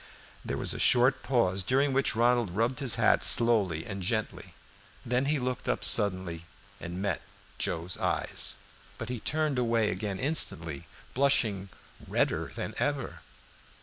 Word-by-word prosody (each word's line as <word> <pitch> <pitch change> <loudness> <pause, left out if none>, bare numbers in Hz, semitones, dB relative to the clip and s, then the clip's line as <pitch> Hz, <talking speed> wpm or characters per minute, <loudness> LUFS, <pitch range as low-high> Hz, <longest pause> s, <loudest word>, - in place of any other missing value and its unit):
There - - -4
was - - +2
a - - -6
short 125 +2 +4
pause, 115 -7 0
during 135 +7 +1
which 135 -4 +3
Ronald 120 -2 +2
rubbed 120 +6 -1
his 135 -6 +5
hat - - +3
slowly 100 -9 +3
and 95 -2 -6
gently. 110 +4 -4 0.5
Then 125 +2 0
he 150 +2 0
looked 125 -1 -4
up 125 - -2
suddenly 95 -6 0 0.3
and 85 +2 -7
met 100 - -2 0.4
Joe's 85 +2 -3
eyes; - - -2 0.4
but 115 - -7
he 125 -2 -4
turned 155 0 -1
away 115 -3 +1
again 100 -3 -4
instantly, 85 - +2 0.3
blushing 115 -8 +1 0.4
redder - - -1
than - - -5
ever. - - -3
115 Hz, 145 wpm, -28 LUFS, 95-130 Hz, 0.5 s, his